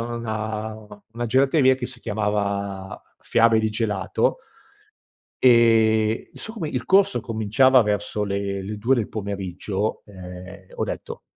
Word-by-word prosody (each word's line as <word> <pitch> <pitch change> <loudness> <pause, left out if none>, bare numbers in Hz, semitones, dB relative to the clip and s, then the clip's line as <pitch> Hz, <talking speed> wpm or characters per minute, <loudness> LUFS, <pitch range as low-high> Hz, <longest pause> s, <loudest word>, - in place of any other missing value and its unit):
una 110 -2 -4 0.4
una 120 +1 -3
gelateria 130 +2 +4
che 130 - -6
si 125 -1 -8
chiamava 100 -3 -2 0.2
Fiabe 115 -1 +3
di 110 0 +1
gelato 105 -3 -1 1.1
ehm, 115 -2 +4
no - - -14
so 220 - -6
come 205 -9 -4
il 125 -5 -3
corso 195 +1 +3
cominciava 115 +4 +3
verso 105 0 -2
le 100 -1 -2
le 105 +2 -5
2 120 +6 +2
del 115 -5 -1
pomeriggio, 100 0 -4
ehm, 95 0 -11
ho - - 0
detto - - -6
110 Hz, 130 wpm, -23 LUFS, 100-120 Hz, 1.1 s, gelateria